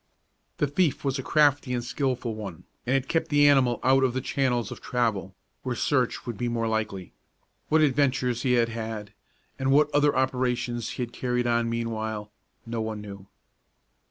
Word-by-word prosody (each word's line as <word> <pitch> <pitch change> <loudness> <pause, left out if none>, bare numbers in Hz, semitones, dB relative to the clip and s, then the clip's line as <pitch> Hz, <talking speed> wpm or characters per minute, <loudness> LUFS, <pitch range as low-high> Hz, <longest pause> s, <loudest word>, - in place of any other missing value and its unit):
The - - +2
thief 145 +1 0
was 135 0 0
a - - -1
crafty 145 -2 +2
and 120 - -2
skilful 125 -2 -2
one, 100 -6 -7 0.2
and 130 - +2
had 135 0 0
kept 165 -1 0
the 145 -1 +5
animal 130 -5 +4
out 135 +1 +4
of 130 -2 +2
the 130 - -1
channels 125 -4 0
of - - -8
travel, 110 -6 -1 0.3
where 125 -2 -3
search 130 -3 0
would 120 -4 -5
be 120 -1 -1
most 115 -1 -1
likely. 105 -5 -3 0.6
What 155 0 +4
adventures 130 -4 +2
he 125 -1 +2
had 120 -1 +3
had, 110 -2 -5 0.5
and 135 0 0
what 150 +2 +4
other 145 0 +3
operations 125 -3 0
he 125 - -3
had 120 0 -7
carried 125 -1 -1
on 120 -1 +1
meanwhile, 110 -2 -3 0.3
no 115 -1 -3
one 110 -1 -3
knew. 100 -2 -10
125 Hz, 180 wpm, -26 LUFS, 115-135 Hz, 0.6 s, the